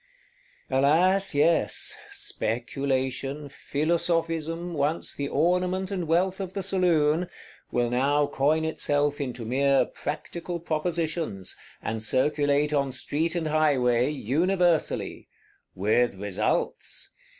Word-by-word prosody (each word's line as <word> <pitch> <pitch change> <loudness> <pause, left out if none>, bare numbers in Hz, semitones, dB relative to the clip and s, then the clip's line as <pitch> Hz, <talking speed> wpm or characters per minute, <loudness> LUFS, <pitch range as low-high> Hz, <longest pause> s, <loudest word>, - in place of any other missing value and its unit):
Alas, 170 +8 +4
yes: 165 +4 +1
Speculation, 135 +3 -2
Philosophism, 165 +3 -1
once 150 +2 -1
the 140 - -3
ornament 180 +5 +1
and 180 -4 -2
wealth 180 +4 +1
of 190 -1 -5
the 195 - -3
saloon, 175 -3 +2 0.4
will 120 -1 0
now 140 +4 +2
coin 150 +3 +1
itself 145 -2 0
into 125 -4 -4
mere 135 +3 +3
Practical 170 +3 -5
Propositions, 160 - -2 0.3
and 110 0 -3
circulate 145 +5 +1
on 140 -2 +1
street 155 +6 -2
and 165 -2 -1
highway, 130 -5 +3
universally; 170 - 0 0.5
with 110 +4 +2
results! 100 +1 -2
150 Hz, 100 wpm, -26 LUFS, 135-170 Hz, 0.5 s, Alas